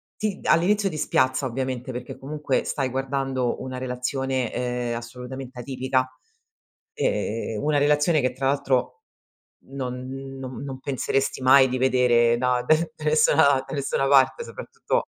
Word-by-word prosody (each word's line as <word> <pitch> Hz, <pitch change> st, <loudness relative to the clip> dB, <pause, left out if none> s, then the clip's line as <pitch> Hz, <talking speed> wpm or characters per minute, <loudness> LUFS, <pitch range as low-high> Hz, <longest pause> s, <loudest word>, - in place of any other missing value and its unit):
ti 210 Hz, -2 st, -3 dB
all'inizio 200 Hz, +4 st, +3 dB
ti 155 Hz, -, -6 dB
spiazza, 130 Hz, -2 st, +1 dB
ovviamente, 130 Hz, 0 st, -3 dB
perché 125 Hz, 0 st, -7 dB
comunque 145 Hz, -1 st, -2 dB
stai 135 Hz, -2 st, -2 dB
guardando 135 Hz, -1 st, -2 dB
una 130 Hz, 0 st, -5 dB
relazione, 130 Hz, 0 st, -2 dB
ehm, 125 Hz, -1 st, -2 dB
assolutamente 125 Hz, +2 st, -8 dB
atipica. 130 Hz, 0 st, -1 dB, 0.9 s
Ehm, 115 Hz, -, -2 dB
una 150 Hz, 0 st, +2 dB
relazione 150 Hz, +2 st, +3 dB
che 130 Hz, -1 st, +1 dB
tra 135 Hz, +1 st, -2 dB
l'altro 135 Hz, -, 0 dB, 0.6 s
non 130 Hz, -2 st, -5 dB, 0.3 s
non 130 Hz, 0 st, -7 dB
non 135 Hz, -2 st, -6 dB
penseresti 135 Hz, 0 st, -1 dB
mai 130 Hz, +1 st, +7 dB
di 130 Hz, -, -1 dB
vedere 120 Hz, -2 st, +3 dB
da 125 Hz, 0 st, +1 dB
d 155 Hz, +4 st, +2 dB
da 155 Hz, -, -10 dB
nessuna 150 Hz, -2 st, +4 dB
da -, -, -7 dB
nessuna 135 Hz, -1 st, 0 dB
parte 140 Hz, -, +4 dB
soprattutto -, -, -3 dB
130 Hz, 140 wpm, -24 LUFS, 125-140 Hz, 0.9 s, mai